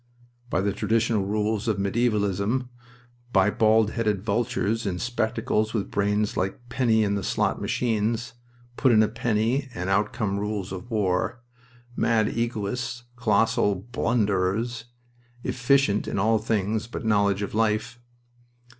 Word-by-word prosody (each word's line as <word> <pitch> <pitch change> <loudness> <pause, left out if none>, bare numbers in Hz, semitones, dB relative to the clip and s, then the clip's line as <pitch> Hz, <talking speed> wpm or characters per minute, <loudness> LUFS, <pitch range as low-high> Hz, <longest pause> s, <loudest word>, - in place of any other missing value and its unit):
"By 95 - +1
the 100 0 0
traditional 110 -2 +1
rules 105 +1 -1
of 110 -3 +1
medievalism. 105 +3 0 0.6
By 95 -1 +4
bald 110 0 +3
headed 105 -5 -1
vultures 115 0 0
in 90 -2 -2
spectacles 115 -1 -1
with 100 - -2
brains 105 +1 0
like 95 +6 -3
penny 115 -3 +2
in 100 -1 0
the 100 - -1
slot - - 0
machines. 115 0 -1 0.4
Put 130 - +4
in 110 -2 +6
a - - +2
penny 115 +4 0
and 90 0 -2
out 105 +2 +2
comes 100 -4 -2
a - - -3
rule 105 0 -2
of 95 +6 -8
war. 105 +1 -1 0.5
Mad 110 -2 +2
egoists! 120 +1 -2
Colossal 115 -3 +2
blunderers! 115 +1 -1 0.6
Efficient 125 -3 +2
in - - -2
all 110 +3 +3
things 110 +1 -1
but 120 - -6
knowledge 100 -2 +2
of 100 - -5
life." 110 +2 0
110 Hz, 135 wpm, -25 LUFS, 100-115 Hz, 0.6 s, in